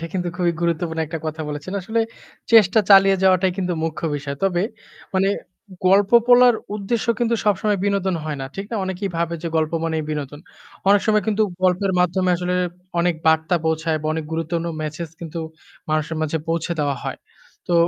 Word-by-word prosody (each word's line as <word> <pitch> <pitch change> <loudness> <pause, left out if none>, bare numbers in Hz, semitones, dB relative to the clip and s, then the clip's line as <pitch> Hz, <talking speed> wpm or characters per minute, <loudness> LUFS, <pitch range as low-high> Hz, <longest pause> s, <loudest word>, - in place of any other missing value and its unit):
এটা 165 - -4
কিন্তু 180 -2 -2
খুবই 175 -1 +1
গুরুত্বপূর্ণ 170 -1 -1
একটা 160 +2 -5
কথা 155 0 -4
বলেছেন। 150 +5 -6
আসলে 220 +5 -1 0.5
চেষ্টা 220 -1 +6
চালিয়ে 195 0 +7
যাওয়াটাই 185 -1 +4
কিন্তু 180 -1 -1
মুখ্য 160 -1 -4
বিষয়। 140 -1 -5
তবে 180 -2 +1 0.5
মানে 190 +1 +3 0.6
গল্প 195 +1 +4 0.2
বলার 245 0 +7 0.2
উদ্দেশ্য 215 +4 -2
কিন্তু 235 -1 +1
সবসময় 205 0 +1
বিনোদন 200 -2 0
হয় 155 -2 -3
না। 135 - -4
ঠিক 195 - -4
না? 230 - -2
অনেকেই 190 +1 -3
ভাবে 170 0 -1
যে 170 - -2
গল্প 155 0 0
মানেই 160 -1 -1
বিনোদন। 145 -1 -5 0.5
অনেক 200 0 +6
সময় 215 -1 +3
কিন্তু 220 0 +2 0.2
গল্পের 185 +1 +2
মাধ্যমে 180 +1 +2
আসলে 180 +1 -2 0.5
অনেক 175 0 +2
বার্তা 160 +2 +3
পৌঁছায় 160 0 0
বা - - -3
অনেক 160 0 -3
গুরুত্বপূর্ন 165 +1 -2
মেসেজ 155 +2 -5
কিন্তু 170 0 -6 0.5
মানুষের 155 +1 -1
মাঝে 155 +1 -1
পৌঁছে 165 +1 -1
দেওয়া 145 -2 0
হয়। - - -4 0.5
তো 175 - +1
175 Hz, 175 wpm, -21 LUFS, 160-195 Hz, 0.6 s, চালিয়ে